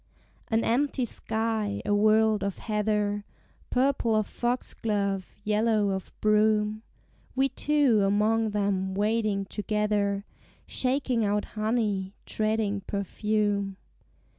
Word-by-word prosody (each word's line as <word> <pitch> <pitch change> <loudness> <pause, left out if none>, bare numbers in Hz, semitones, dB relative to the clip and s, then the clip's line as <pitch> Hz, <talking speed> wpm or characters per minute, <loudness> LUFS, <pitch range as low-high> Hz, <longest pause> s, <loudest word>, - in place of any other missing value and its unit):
An 225 0 +1
empty 260 +2 +1
sky, 220 -2 -2
a 205 - +1
world 215 0 +4
of 200 -1 -2
heather, 210 -1 0 0.5
Purple 255 -3 +2
of 215 -1 +2
foxglove, 205 -6 -2
yellow 215 0 +2
of 190 -1 -4
broom: 215 0 +3 0.5
We 270 +1 +3
two 275 -5 +2
among 215 +3 +2
them 200 -2 -1
wading 210 -1 +1
together, 210 -1 -1 0.4
Shaking 255 -3 0
out 205 0 +1
honey, 215 -3 -1
treading 215 -2 0
perfume. 200 -1 -1
215 Hz, 100 wpm, -27 LUFS, 205-225 Hz, 0.5 s, world